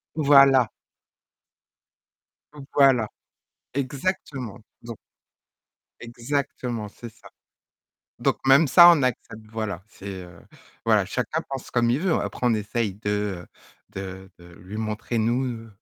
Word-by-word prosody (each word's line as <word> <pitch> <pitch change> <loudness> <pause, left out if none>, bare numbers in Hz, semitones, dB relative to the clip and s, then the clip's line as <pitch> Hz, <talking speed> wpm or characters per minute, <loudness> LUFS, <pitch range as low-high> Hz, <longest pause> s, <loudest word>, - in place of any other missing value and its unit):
Voilà. 140 -5 +5 2.0
Voilà, 135 -6 +4 0.7
exactement! 135 - -3 0.2
Donc 115 -2 -9 1.0
exactement, 120 -2 -4
c'est 115 +3 -11
ça. - - -18 0.9
Donc - - +1
même 140 +4 +6
ça, 175 +6 +9
on 160 -5 +4
accepte, 110 -3 -3
voilà, 110 -6 -4
c'est, 100 -1 -11 0.2
heu 85 -1 -15 0.4
voilà - - +3
chacun - - -2
pense 135 -2 -6
comme 120 -1 +2
il 130 - +1
veut, 185 -1 +1
après - - -2
on 120 - +4
essaie 110 +1 -2
de, 105 +2 -7
heu, 105 -4 -2 0.4
de 95 0 -8
de 85 0 -16
lui 95 +4 -9
montrer 110 +2 -3
nous 115 0 -1
115 Hz, 120 wpm, -24 LUFS, 105-135 Hz, 2.0 s, ça